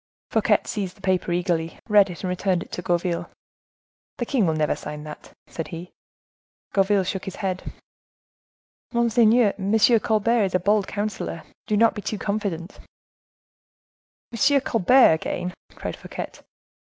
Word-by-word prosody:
Fouquet - - +3
seized 200 -2 -4
the - - -20
paper 185 -2 0
eagerly, 170 -2 -1
read 205 -3 +5
it, 175 - -8
and 185 - -1
returned 180 -1 0
it - - -20
to - - -4
Gourville. 175 0 -1 0.9
"The 240 - -2
king 235 -7 +1
will 160 - +1
never 155 -1 +1
sign 150 0 -7
that," 150 0 -10
said 165 - -6
he. 170 +1 -8 0.8
Gourville 195 0 +3
shook 185 +1 -4
his 190 - -6
head. 185 -2 -3 1.2
"Monseigneur, 235 -2 +4
M. 200 +3 +1 0.2
Colbert 220 +1 +2
is 185 - -2
a - - +3
bold 205 +2 +2
councilor: 205 -5 -4 0.2
do 210 - +1
not 230 +1 +5
be 210 - -6
too 215 - -3
confident!" 200 -4 -3 1.5
"Monsieur 275 +4 +3
Colbert 245 -3 +5
again!" 180 +3 -3 0.2
cried - - -5
Fouquet. - - -7
195 Hz, 145 wpm, -24 LUFS, 175-215 Hz, 1.5 s, read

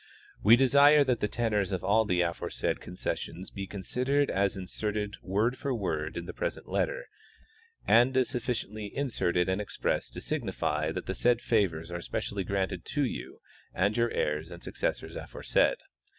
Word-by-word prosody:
We 110 +3 +8
desire 140 +3 +6
that 125 -3 +1
the 105 - +1
tenors 105 -4 0
of 95 -2 -2
all 110 +2 +3
the 90 -3 +2
aforesaid 85 -1 -2
concessions 90 +1 -5
be 100 -1 -5
considered 130 +9 0
as 100 0 +1
inserted, 105 +2 -2
word 110 +7 0
for 135 -2 -1
word, 80 -8 -2
in 85 - -4
the - - -7
present - - -4
letter, - - -1 0.8
and 120 +3 +5
as 130 -2 +3
sufficiently 110 -3 -3
inserted 90 -10 +1
and 95 +2 0
expressed 105 - -2
to - - -6
signify - - -1
that - - -4
the - - -2
said 120 -1 +3
favors 90 -9 0
are 85 0 -4
specially 100 +3 -3
granted 95 0 -2
to 145 -2 0
you - - -6 0.3
and 100 +3 +2
your 120 0 +2
heirs 75 -2 -1
and 85 -1 -10
successors - - -3
aforesaid. - - +1
105 Hz, 165 wpm, -29 LUFS, 95-125 Hz, 0.8 s, We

